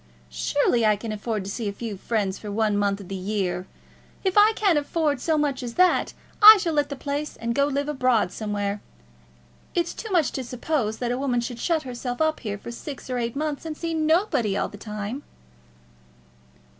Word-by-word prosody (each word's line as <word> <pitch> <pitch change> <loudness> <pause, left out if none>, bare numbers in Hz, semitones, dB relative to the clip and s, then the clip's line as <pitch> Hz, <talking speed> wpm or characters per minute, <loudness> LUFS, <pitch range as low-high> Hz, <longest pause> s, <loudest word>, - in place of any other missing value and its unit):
Surely 235 - +1
I 215 -1 +4
can 215 +2 -6
afford 215 -1 -3
to 200 - -4
see 220 -1 -3
a - - -3
few 215 +1 -5
friends 200 -1 -2
for 210 - -6
one 215 0 +1
month 200 -1 +1
in 190 - -11
the 195 - -6
year. 185 -2 -2 0.6
If 380 -2 0
I 415 0 +8
find - - +5
I - - -1
can't 390 -7 +4
afford 295 -2 -1
so 320 -2 +1
much 285 -3 0
as 240 -2 -6
that, 365 0 +3 0.3
I 430 +1 +12
shall 340 -4 -1
let 290 -1 +1
the 280 - -4
place, 285 +2 -4
and 235 0 -2
go 280 +3 +2
and 285 - -3
live 285 +1 0
abroad 255 -9 +2
somewhere. 205 -1 -3 0.9
It's 345 -1 0
too 440 - -7
much 340 -6 +3
to 265 - -4
suppose 245 -2 -2
that 240 -1 -2
a 245 - -1
woman 260 -3 +1
should 240 0 -4
shut 325 +1 0
herself 245 -1 -5
up 315 0 +1
here 205 -3 -4
for 220 - -8
six 260 +2 -8
or 250 - -1
eight 235 +1 -2
months 300 0 -2
and 315 -2 -5
see 335 -1 -3
nobody 310 - +2
all - - -1
the - - -11
time." 210 +5 -5
245 Hz, 215 wpm, -25 LUFS, 210-300 Hz, 0.9 s, I